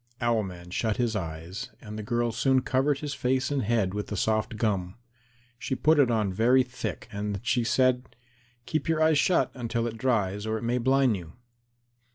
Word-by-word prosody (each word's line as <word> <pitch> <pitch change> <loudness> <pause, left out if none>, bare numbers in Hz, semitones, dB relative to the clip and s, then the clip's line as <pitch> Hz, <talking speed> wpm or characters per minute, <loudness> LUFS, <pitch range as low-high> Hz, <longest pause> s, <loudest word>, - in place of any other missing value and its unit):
Owl 120 -2 +2
man 90 -3 -8
shut 110 +3 -1
his 120 -3 0
eyes, 90 +6 -5
and 105 -1 -9
the 110 - -4
girl 120 +2 0
soon 130 +3 +2
covered 135 +3 +1
his 145 -2 -3
face 130 +1 0
and 140 -2 +1
head 105 -4 +1
with 105 0 -3
the 105 - -4
soft 110 +2 0
gum. 100 -4 -1 0.6
She 130 - -2
put 155 +3 +3
it 135 -4 +5
on 105 -5 +1
very 125 +6 +4
thick, 125 -1 -6
and 100 -1 -3
she 120 0 +1
said, 130 0 +1 0.5
"Keep 155 +6 -2
your 160 -1 +2
eyes 155 -2 +4
shut 170 -7 +2
until 115 -2 -2
it 115 -1 -5
dries 105 -5 0
or 110 0 0
it 110 - -7
may 120 +2 0
blind 130 -2 +3
you." 85 -2 -10
115 Hz, 195 wpm, -27 LUFS, 105-130 Hz, 0.6 s, it